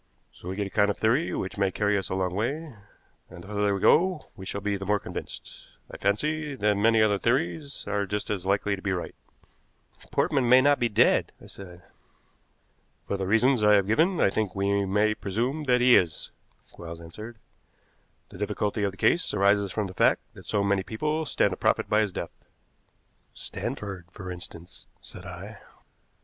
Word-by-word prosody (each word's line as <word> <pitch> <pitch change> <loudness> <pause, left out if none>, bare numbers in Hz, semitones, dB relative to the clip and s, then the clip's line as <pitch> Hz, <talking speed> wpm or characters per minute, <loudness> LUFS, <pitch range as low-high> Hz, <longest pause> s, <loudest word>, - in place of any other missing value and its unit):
So 90 - -10
we 95 - -4
get 100 0 -2
a 100 - -7
kind 105 0 +3
of 105 - -1
theory 125 +9 +1
which 95 +1 -4
may 100 -1 +3
carry 105 +1 0
us 95 - -2
a - - -2
long 95 -1 -1
way, 140 - -3 0.6
and 85 - -11
the - - -13
further 105 -1 0
we - - -3
go 180 - +3
we 95 -3 -9
shall 100 - -3
be 100 0 -1
the 95 - -5
more 105 +1 +1
convinced, - - -9 0.2
I - - -8
fancy, 150 +9 -1
that 105 -4 +2
many 110 +2 +4
other 105 -2 +2
theories 140 - -1
are 100 -1 -1
just 105 +2 -3
as 100 -4 -2
likely 100 +1 +1
to 95 - -11
be 100 -1 -1
right." 90 - -4 1.0
"Portman 130 -4 +1
may 130 +1 +8
not 145 +2 +4
be 120 - +1
dead," 105 - +3
I - - -15
said. 90 -3 -12 1.2
"For - - -1
the 95 -1 -3
reasons 115 +3 +3
I 105 0 +6
have 100 -2 +3
given 160 - +2
I 100 - +3
think 105 -4 -2
we 100 0 +1
may 105 +3 +2
presume 120 +10 -2
that 125 -2 +3
he 125 0 +7
is," 85 -4 +1 0.4
Quarles 85 -1 -9
answered. 105 +8 -10 0.9
"The - - -12
difficulty 105 0 -2
of 100 - +1
the 100 - -12
case 170 - +2
arises 100 0 +3
from 105 +1 -1
the 95 - -7
fact - - +3
that - - -14
so 105 -2 +1
many 100 -1 +1
people 150 +10 -2
stand - - +1
to - - -4
profit - - +1
by 105 - +3
his 105 -3 +1
death." - - -8 0.9
"Stanford, 95 -4 -6
for 95 0 -8
instance," 90 -1 -10
said - - -11
I. - - -9
105 Hz, 195 wpm, -26 LUFS, 95-120 Hz, 1.2 s, may